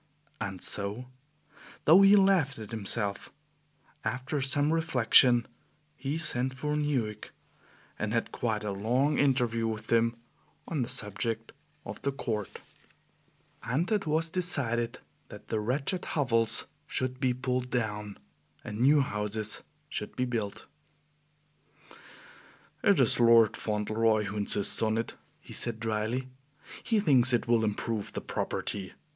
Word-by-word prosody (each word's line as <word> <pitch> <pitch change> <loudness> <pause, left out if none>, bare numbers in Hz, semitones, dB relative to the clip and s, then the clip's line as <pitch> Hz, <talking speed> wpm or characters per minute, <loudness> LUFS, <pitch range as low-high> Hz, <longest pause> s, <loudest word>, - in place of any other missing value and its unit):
And 95 -2 -5
so 105 +5 +3 0.8
though 170 +6 +7
he 195 +1 +7
laughed 190 -8 +3
at 110 -1 -9
himself 100 -2 -2 0.7
after 130 +3 -2
some 145 +3 +1
reflection, 125 -6 +5 0.5
he 140 +2 -3
sent 130 -5 +2
for 150 +3 -2
Newick, 135 -8 -2 0.7
and 105 0 -2
had 115 0 -1
quite 110 -3 -2
a 105 - -2
long 125 +9 0
interview 120 -5 +1
with 110 -1 -5
him 115 0 +3 0.5
on 155 -5 -2
the 120 - -2
subject 110 +2 0 0.3
of - - -8
the 140 - -1
Court, 110 -7 -5 1.0
and 150 - -2
it 205 -5 0
was 160 +2 +1
decided 125 -9 +1 0.3
that - - -12
the 110 - -1
wretched 135 - -1
hovels 115 -6 +1 0.2
should 130 0 -2
be 130 -2 +1
pulled 125 0 -2
down 105 -4 -3 0.5
and 105 +1 -7
new 140 +4 +5
houses 105 -2 -1 0.3
should - - -5
be 125 - 0
built. 115 -5 -4 2.2
"It - - +4
is - - +3
Lord 115 -2 +5
Fauntleroy 110 +1 0
who 100 +1 -5
insists 100 -1 +1
on 110 0 +1
it," 115 - -3 0.2
he - - -13
said 115 -2 -3
dryly; 115 +3 -2 0.6
"he 225 -2 +1
thinks 130 - +4
it 120 - +1
will 115 -1 +3
improve 110 0 -3
the - - -4
property. 95 -3 -4
120 Hz, 130 wpm, -29 LUFS, 110-135 Hz, 2.2 s, though